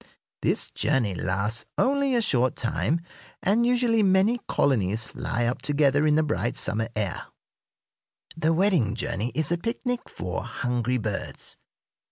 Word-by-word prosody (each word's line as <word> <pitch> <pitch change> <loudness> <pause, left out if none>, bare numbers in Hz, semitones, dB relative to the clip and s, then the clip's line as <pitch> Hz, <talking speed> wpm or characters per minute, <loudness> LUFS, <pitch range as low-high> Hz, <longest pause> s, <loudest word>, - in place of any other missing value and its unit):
This - - 0
journey 115 -7 +1
lasts 100 +6 -1
only 275 0 +2
a 235 - +2
short 130 - +2
time, 145 +7 -1 0.4
and 225 +5 +3
usually 240 -2 +3
many 195 +4 +3
colonies 110 -5 +1
fly 120 +1 -2
up 120 +1 -1
together 145 +1 +2
in 150 - +4
the 155 - +3
bright 135 -5 -1
summer 110 +1 -1
air. 105 -4 -2 1.1
The 160 0 +1
wedding 165 - +2
journey 115 0 -2
is 155 0 +1
a 175 - +1
picnic 245 +3 -3
for 90 -1 -4
hungry 125 0 -1
birds. 110 -3 -5
140 Hz, 140 wpm, -26 LUFS, -, 1.1 s, in